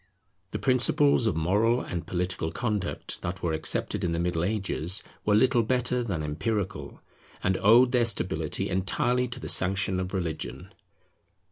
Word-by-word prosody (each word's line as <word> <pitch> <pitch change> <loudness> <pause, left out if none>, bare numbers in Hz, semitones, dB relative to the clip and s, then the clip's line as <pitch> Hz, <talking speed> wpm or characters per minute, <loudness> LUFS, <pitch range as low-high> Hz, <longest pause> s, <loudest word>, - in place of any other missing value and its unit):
The - - -4
principles 130 0 +3
of 100 - 0
moral 105 +9 +2
and 85 -8 -5
political 90 -2 -2
conduct 105 -6 -3
that 90 +1 -5
were 85 -2 0
accepted 80 +4 0
in 85 -2 0
the 85 - -1
Middle 85 -1 -1
Ages 95 -2 -1 0.2
were 105 - +3
little 125 +2 +4
better 125 +1 0
than 90 -9 -3
empirical, 95 +7 -3 0.4
and 95 +1 +1
owed 120 +4 +5
their 125 -2 +3
stability 110 -3 0
entirely 120 +7 0
to 125 +1 -7
the - - -7
sanction 95 0 +2
of 90 0 -4
religion. 85 -5 -5
100 Hz, 150 wpm, -27 LUFS, 90-120 Hz, 0.4 s, owed